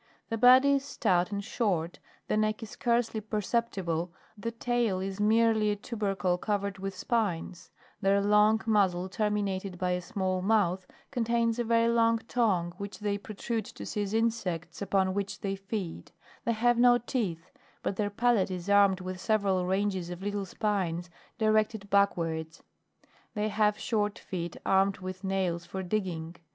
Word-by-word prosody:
The 225 - -1
body 255 +4 +7
is 275 - -5
stout 185 -9 +1
and 200 0 -3
short, 185 -7 -1 0.3
the - - +1
neck 215 +1 0
is 220 - -8
scarcely 235 -2 0
perceptible, 200 -6 -1 0.2
the 220 +2 -4
tail 230 -4 0
is 195 +1 -4
merely 220 0 +3
a 205 - +1
tubercle 195 -4 -1
covered 200 -1 -2
with 195 0 -4
spines; 185 -5 -2 0.3
their 195 0 +3
long 210 +2 +4
muzzle 190 -4 +2
terminated 200 -2 -1
by 180 0 0
a 180 0 0
small 185 0 -2
mouth, 190 -3 +1 0.2
contains 235 -1 +1
a - - +2
very 230 0 +3
long 230 0 +3
tongue, 185 -8 +1
which 200 0 -6
they 205 -1 -2
protrude 215 +1 -4
to - - -9
seize 205 0 -2
insects, 225 -8 -1
upon 190 -1 +1
which 200 0 -3
they 195 -1 -2
feed; 195 -2 -5 0.3
they 235 - +2
have 240 +2 +2
no 245 0 +6
teeth, 200 -9 -3 0.3
but - - -1
their 205 +1 0
palate 225 -2 +2
is 185 +1 -3
armed 200 -2 +5
with 185 0 -6
several 195 -4 +1
ranges 190 -2 0
of 175 +1 -7
little 205 -1 -2
spines 180 -5 -2 0.3
directed 215 -2 +1
backwards; 165 -5 +1 0.7
they 210 0 0
have 210 0 +2
short 210 -2 -1
feet 175 -2 -5
armed 195 +1 +3
with 185 +1 -7
nails 185 -3 -1
for 190 0 -4
digging. 175 -4 -3
200 Hz, 155 wpm, -29 LUFS, 185-220 Hz, 0.7 s, body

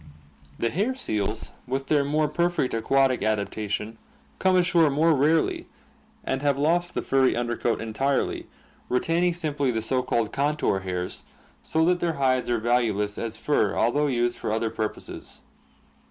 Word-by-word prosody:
The 115 - -1
hair 215 +9 0
seals 110 - -3 0.2
with 135 +2 -2
their 145 0 +2
more 150 +2 +1
perfect 170 -3 0
aquatic 130 +3 +2
adaptation 105 +1 -2 0.4
come 190 -1 +3
ashore 175 -3 +4
more 160 +4 +3
rarely 155 +3 +1 0.6
and 135 0 -2
have 140 -2 +1
lost 170 +4 +1
the - - -1
furry 135 -1 +3
under 120 0 -1
coat 115 0 -1
entirely, 130 +5 -1 0.4
retaining 165 +7 +1
simply 150 -5 -1
the 110 -2 -1
so 130 +3 +1
called 120 -4 -1
contour 145 -7 +1
hairs, 90 -1 -5 0.4
so 160 0 +1
that 180 +1 +2
their 170 -2 0
hides 130 -3 +1
are 120 - +2
valueless 110 -3 0
as 115 -1 -4
fur 110 -5 +1
al 115 - +3
though 145 +2 +1
used 120 -2 0
for - - -2
other 110 0 -1
purposes. 110 -1 -6
130 Hz, 155 wpm, -25 LUFS, 115-155 Hz, 0.6 s, ashore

